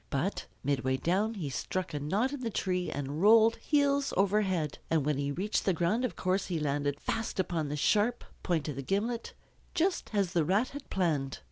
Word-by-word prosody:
But 160 +9 -2 0.2
midway 130 -1 +1
down 200 +9 0
he 155 -9 -4
struck 180 +5 -3
a 145 - -2
knot 205 - 0
in 285 - -4
the 240 -2 -2
tree 180 -3 -1
and 145 +2 -4
rolled 225 +2 +6
heels 285 -2 +1
over 200 +2 +3
head. 175 -7 -1
And 160 -4 +2
when 150 -2 0
he 140 0 -1
reached 195 +8 -1
the 190 - +2
ground 185 +9 +1
of 250 - -3
course 185 +1 0
he 175 -3 -1
landed 145 -1 -1
fast 225 -3 -3
upon 165 -5 -1
the 145 - -2
sharp 215 +9 +2 0.2
point 165 -5 0
of 145 -3 -4
the - - -2
gimlet, 220 - -2 0.4
just 360 +2 +1
as 200 -4 0
the 170 -3 +3
Rat 200 +10 +2
had 285 0 -9
planned. 150 -8 0
185 Hz, 205 wpm, -30 LUFS, 150-220 Hz, 0.4 s, rolled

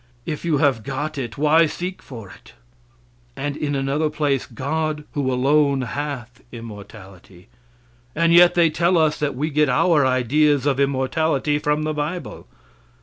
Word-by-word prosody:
If 155 -3 -5
you 165 -3 +1
have 140 -6 +2
got 145 +5 -4
it, 120 -4 -6
why 155 +3 +4
seek 180 +4 -6
for 115 -6 -10
it? - - -17 0.8
And 145 0 -4
in 145 -1 -2
another 140 +3 0
place: 145 -3 -1
"God, 150 +4 -3
who 135 -3 -1
alone 140 +2 +2
hath 130 -2 -6
immortality;" 100 -4 -12 0.7
and 165 +1 +2
yet 175 0 +6
they 170 -2 +4
tell 170 +3 +2
us 155 -1 +1
that 145 -3 -2
we 150 +5 -2
get 150 -1 +2
our 145 +4 +3
ideas 135 +3 +2
of 140 -2 +1
immortality 140 +2 0
from 150 0 0
the 155 0 -2
bible. 150 - -5
145 Hz, 150 wpm, -21 LUFS, 130-155 Hz, 0.8 s, yet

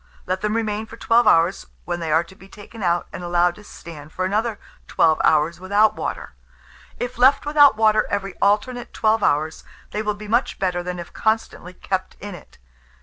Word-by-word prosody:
Let 185 +1 -2
them 210 +1 -1
remain 220 -1 -2
for 230 - -12
12 235 +1 +3
hours, 170 +4 +3 0.2
when 175 0 -3
they 165 -2 -3
are 160 +2 +3
to 170 - -16
be 195 +1 -17
taken 210 +2 -12
out, 175 -2 +1
and 180 - -7
allowed 175 0 +2
to 210 - -15
stand 155 -6 -11
for 185 - -2
another 215 +3 -1 0.3
12 160 -1 +2
hours 160 +2 +2
without 205 +3 +2
water. - - -5 0.7
If 245 0 -5
left 270 +3 +5
without 290 -5 +5
water 215 -1 +3
every 195 -1 -3
alternate 235 +5 0
12 220 0 +2
hours, 155 -1 0 0.3
they 210 - -2
will 210 -1 -2
be 210 0 -10
much 235 +5 0
better 180 -2 -1
than 180 0 -5
if 175 -1 -9
constantly 220 -5 -2
kept 185 0 -4
in 205 -1 -7
it. 175 - -14
200 Hz, 195 wpm, -21 LUFS, 175-220 Hz, 0.7 s, left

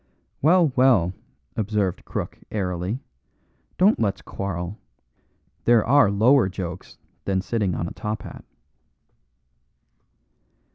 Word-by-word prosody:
"Well, 165 -1 +4
well," 120 -10 +4 0.4
observed 105 -3 -1
Crook, - - -5
airily, 90 +1 -2 0.8
"don't 200 +4 +4
let's 100 -3 -1
quarrel. 95 0 -5 0.9
There 120 -2 +5
are 135 -4 +5
lower 110 +2 +4
jokes 90 -1 -7 0.3
than 95 -1 +1
sitting 100 -2 -1
on 85 - -2
a - - -7
top 105 0 -4
hat." - - -10
100 Hz, 100 wpm, -24 LUFS, 95-120 Hz, 0.9 s, There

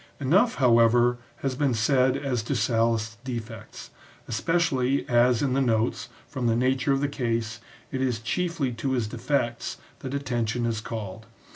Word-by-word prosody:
Enough, 185 - +3
how 120 -4 +4
ever, 120 +1 +4 0.2
has 135 -1 0
been 135 -1 +1
said 130 +3 +3
as 135 -4 -1
to 115 +6 -2
Sallust's 115 -1 +1
defects, 115 -3 -7 0.4
especially 135 -1 +1
as 120 0 +3
in 135 -3 +1
the 135 - +2
notes, 115 0 0 0.2
from 130 -5 -2
the 115 - +3
nature 130 +3 +1
of 135 0 +2
the 145 - +1
case, 115 -4 -2 0.3
it 130 - -2
is 125 -4 0
chiefly 165 +2 -1
to 125 +3 -2
his 120 -4 0
defects 120 +1 -2 0.2
that 135 +1 -5
attention 120 -4 -1
is 115 -2 -1
called. 110 -1 -6
125 Hz, 160 wpm, -26 LUFS, 115-135 Hz, 0.4 s, how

